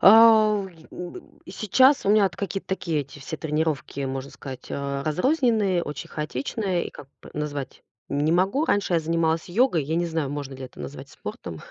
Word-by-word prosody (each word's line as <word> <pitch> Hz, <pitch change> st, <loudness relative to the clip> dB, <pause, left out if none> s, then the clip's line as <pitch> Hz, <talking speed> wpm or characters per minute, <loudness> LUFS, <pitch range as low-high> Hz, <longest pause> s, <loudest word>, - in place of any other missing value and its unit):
А, 220 Hz, +1 st, +8 dB
в 200 Hz, -2 st, -1 dB
э, 190 Hz, -, -13 dB
й 160 Hz, -1 st, -17 dB
н 180 Hz, -1 st, -6 dB
б -, -, -8 dB, 0.2 s
и -, -, -10 dB
сейчас 260 Hz, +8 st, +4 dB
у -, -, +5 dB
меня 210 Hz, -1 st, +6 dB
вот 190 Hz, -, -1 dB
какие-то 195 Hz, 0 st, -4 dB
такие 180 Hz, -5 st, -1 dB
эти 140 Hz, +1 st, -9 dB
все 145 Hz, +4 st, -5 dB
тренировки, 155 Hz, -2 st, -1 dB
можно 135 Hz, 0 st, -3 dB
сказать, 135 Hz, -2 st, -9 dB
а, 140 Hz, 0 st, -2 dB
разрозненные, 210 Hz, -, +2 dB
очень 150 Hz, -, -6 dB
хаотичные. 170 Hz, -, -2 dB
И, -, -, -8 dB
как 135 Hz, -, -11 dB, 0.2 s
бы, -, -, -12 dB
назвать 145 Hz, -3 st, -4 dB, 0.3 s
не 145 Hz, +3 st, +1 dB
могу. 190 Hz, -, +2 dB
Раньше 205 Hz, -, +1 dB
я 165 Hz, -, +4 dB
занималась 165 Hz, +1 st, 0 dB
йогой. 180 Hz, -, +3 dB
Я 155 Hz, +4 st, -2 dB
не 175 Hz, 0 st, +1 dB
знаю, 160 Hz, -4 st, -1 dB
можно 140 Hz, -2 st, -5 dB
ли 130 Hz, 0 st, -7 dB
это 130 Hz, -, -11 dB
назвать 140 Hz, -1 st, -7 dB
спортом. 100 Hz, -9 st, -7 dB
165 Hz, 205 wpm, -25 LUFS, 145-195 Hz, 0.3 s, А